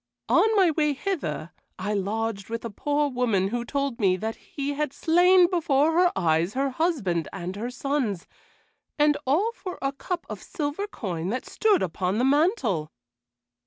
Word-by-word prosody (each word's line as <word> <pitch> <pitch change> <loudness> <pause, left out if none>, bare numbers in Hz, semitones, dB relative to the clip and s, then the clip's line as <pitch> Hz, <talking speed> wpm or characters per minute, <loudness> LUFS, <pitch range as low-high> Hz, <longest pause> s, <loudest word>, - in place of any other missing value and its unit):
"On 440 0 +4
my 375 -5 +5
way 300 -1 +1
hither 265 - -3 0.3
I 205 +3 -2
lodged 205 0 -2
with 230 0 -4
a 230 - -4
poor 290 +7 0
woman 235 -8 +1
who 240 +2 -2
told 275 -1 -2
me 190 -4 +3
that 220 +4 -3
he 285 0 -5
had 295 -1 -2
slain 355 +2 +5
before 315 -4 +2
her 350 +2 +4
eyes 170 +2 +1
her 270 0 0
husband 250 - 0
and 185 -1 -5
her 225 +4 -4
sons, 250 - -2 0.7
and 295 0 +4
all 370 - +2
for 375 -6 -7
a 275 0 -1
cup 345 +5 -4
of - - -7
silver 305 +6 -3
coin 180 - -4
that 250 +5 -3
stood 425 -4 +2
upon 185 +3 -1
the 245 - +2
mantel." 270 - +1
270 Hz, 165 wpm, -26 LUFS, 200-315 Hz, 0.7 s, my